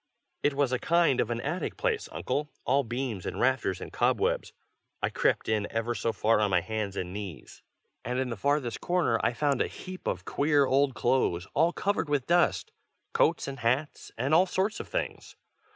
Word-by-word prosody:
It 145 -1 +1
was 140 -2 +1
a 130 - +1
kind 170 -6 +3
of 115 - -2
an 120 -1 -1
attic 155 +7 -3
place, 450 -3 -1
Uncle, 150 +1 -2 0.2
all 140 +2 +3
beams 120 -5 -3
and - - -4
rafters 120 -7 +1
and - - -8
cobwebs. - - +1 0.5
I - - -1
crept - - +1
in 105 -2 +1
ever 115 +1 -1
so 115 - -1
far 110 0 +2
on 105 -1 +2
my 90 -2 +3
hands 100 +1 -3
and 90 0 -3
knees, 95 -9 -8 0.4
and 125 +2 -2
in 130 -1 0
the - - -2
farthest 140 +1 0
corner 175 -10 +1
I 120 - +2
found 140 +1 +1
a - - +2
heap 185 0 -9
of - - -2
queer 145 -1 +3
old 135 0 +2
clothes 105 -7 +1
all 165 +3 +3
covered 200 -4 -1
with 145 -3 +1
dust; 175 - +2 0.4
coats 465 - +2
and 135 -1 -6
hats, 125 +6 -1
and 130 +6 0
all 180 +4 +6
sorts 195 +4 -1
of - - -6
things. - - -4
130 Hz, 195 wpm, -28 LUFS, 115-150 Hz, 0.5 s, all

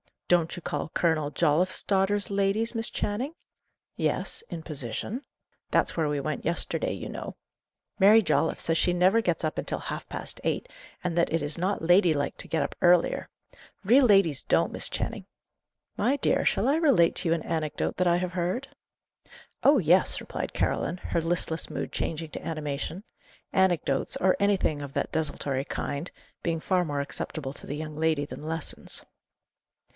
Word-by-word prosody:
"Don't 170 -1 +2
you 175 - -7
call - - -3
Colonel 155 -3 +1
Jolliffe's 170 +4 +1
daughters 200 +1 +1
ladies, 200 +4 +1
Miss 225 -1 -1
Channing?" 245 +10 -2 0.6
"Yes - - -1
in 165 - -6
position." 150 - -4 0.5
"That's - - +2
where 160 -2 +1
we 145 -1 -1
went 150 0 -3
yesterday, 335 - 0
you - - -6
know. - - -6 0.6
Mary 210 +3 +7
Jolliffe 160 -3 +1
says 165 0 +1
she 180 - +2
never 185 +6 +4
gets 175 -6 -1
up 155 - -1
until - - -2
half - - -5
past - - -5
eight, - - -1 0.3
and 175 -1 -2
that 170 - +2
it 165 0 +1
is 145 +3 0
not 190 +4 -1
lady 175 0 +5
like 145 -1 -2
to - - -6
get 160 - 0
up - - -5
earlier. 175 -1 +4 0.6
Real 250 +7 +6
ladies 195 - +4
don't, - - +2
Miss - - -1
Channing." - - -4 0.7
"My 245 +7 +2
dear, 285 - +1
shall 215 - +2
I 285 +3 +3
relate 270 - +4
to 170 - 0
you 165 - +4
an 165 - -4
anecdote 160 -2 -2
that 180 - +2
I 170 - +4
have 180 0 -1
heard?" 185 +9 -2 0.9
"Oh, 285 +1 +6
yes!" 180 +1 +4
replied - - -5
Caroline, 165 +5 0
her 170 -1 -2
listless 165 -1 -1
mood - - -4
changing 160 -1 -3
to - - -7
animation; 155 +3 -4 0.5
anecdotes, 175 -8 +2
or 185 0 +2
anything 200 -7 +1
of 140 -1 -7
that - - -1
desultory 140 -3 -2
kind, 145 +4 -4 0.3
being 165 -2 -1
far 180 0 +1
more 145 -2 -1
acceptable 140 0 -5
to - - -11
the 145 - -3
young 155 0 -6
lady 160 -2 +1
than 150 +1 -8
lessons. 165 -1 -3
170 Hz, 170 wpm, -27 LUFS, 155-195 Hz, 0.9 s, Mary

